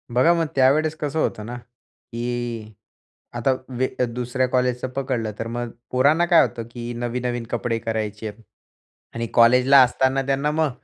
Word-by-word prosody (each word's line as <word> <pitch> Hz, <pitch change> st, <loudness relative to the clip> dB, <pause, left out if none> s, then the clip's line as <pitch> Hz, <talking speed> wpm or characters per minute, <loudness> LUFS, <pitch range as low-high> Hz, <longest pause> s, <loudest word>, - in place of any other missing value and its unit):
बघा, 145 Hz, +8 st, +5 dB
मग 165 Hz, -1 st, +1 dB
त्यावेळेस 150 Hz, +4 st, +3 dB
कसं 150 Hz, +1 st, -2 dB
होतं 105 Hz, -8 st, -1 dB
ना, 120 Hz, +2 st, -6 dB
की 120 Hz, -2 st, -7 dB, 0.6 s
आता 130 Hz, +3 st, +2 dB, 0.3 s
वे 130 Hz, +1 st, +1 dB, 0.2 s
दुसऱ्या 125 Hz, +1 st, -1 dB
कॉलेजचं 125 Hz, 0 st, 0 dB
पकडलं, 125 Hz, -5 st, -2 dB
तर 115 Hz, -, -3 dB
मग 120 Hz, 0 st, -4 dB, 0.2 s
पोरांना 145 Hz, +7 st, +3 dB
काय 170 Hz, -1 st, +6 dB
होतं, 115 Hz, -, -1 dB
की 120 Hz, 0 st, -6 dB
नवीन-नवीन 120 Hz, 0 st, -3 dB
कपडे 120 Hz, -1 st, -1 dB
करायचे 110 Hz, -1 st, -3 dB
आहेत. 105 Hz, +2 st, -9 dB, 0.7 s
आणि 115 Hz, 0 st, -3 dB
कॉलेजला 125 Hz, +4 st, +6 dB
असताना 130 Hz, +2 st, +1 dB
त्यांना 140 Hz, +2 st, +1 dB
मग 155 Hz, 0 st, +1 dB
125 Hz, 150 wpm, -22 LUFS, 115-135 Hz, 0.7 s, काय